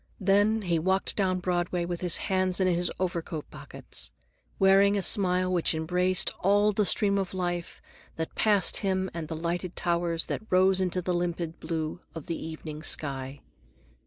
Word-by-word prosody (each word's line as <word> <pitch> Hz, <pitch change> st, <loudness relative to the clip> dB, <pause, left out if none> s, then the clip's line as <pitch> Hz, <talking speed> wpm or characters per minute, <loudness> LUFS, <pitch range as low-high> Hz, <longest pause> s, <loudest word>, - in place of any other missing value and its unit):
Then 205 Hz, +2 st, +2 dB
he 170 Hz, -3 st, +1 dB
walked 190 Hz, +4 st, 0 dB
down 185 Hz, -2 st, 0 dB
Broadway 175 Hz, -1 st, -1 dB
with 175 Hz, -1 st, -4 dB
his 180 Hz, -3 st, +3 dB
hands 185 Hz, -1 st, 0 dB
in 190 Hz, -, +2 dB
his 175 Hz, -1 st, +1 dB
overcoat 170 Hz, -4 st, -3 dB
pockets, -, -, -4 dB, 0.5 s
wearing 195 Hz, +1 st, +5 dB
a 195 Hz, -, -1 dB
smile 185 Hz, -3 st, +3 dB
which 170 Hz, -2 st, +2 dB
embraced 180 Hz, +3 st, +2 dB
all 205 Hz, +2 st, +3 dB
the 210 Hz, -1 st, 0 dB
stream 200 Hz, -1 st, +2 dB
of 190 Hz, -1 st, -4 dB
life 175 Hz, -2 st, -3 dB, 0.3 s
that 160 Hz, 0 st, -4 dB
passed 205 Hz, -4 st, +3 dB
him 190 Hz, -1 st, -1 dB
and 165 Hz, -2 st, -5 dB
the 160 Hz, -, -5 dB
lighted 170 Hz, +2 st, -3 dB
towers 170 Hz, -1 st, 0 dB
that -, -, -3 dB
rose 190 Hz, +1 st, +3 dB
into 180 Hz, -1 st, -1 dB
the 180 Hz, -, -1 dB
limpid 170 Hz, -1 st, -3 dB
blue 160 Hz, 0 st, -3 dB, 0.2 s
of 160 Hz, -, -7 dB
the 165 Hz, -, -3 dB
evening 155 Hz, -1 st, -7 dB
sky. 135 Hz, -3 st, -4 dB
180 Hz, 165 wpm, -27 LUFS, 170-190 Hz, 0.5 s, wearing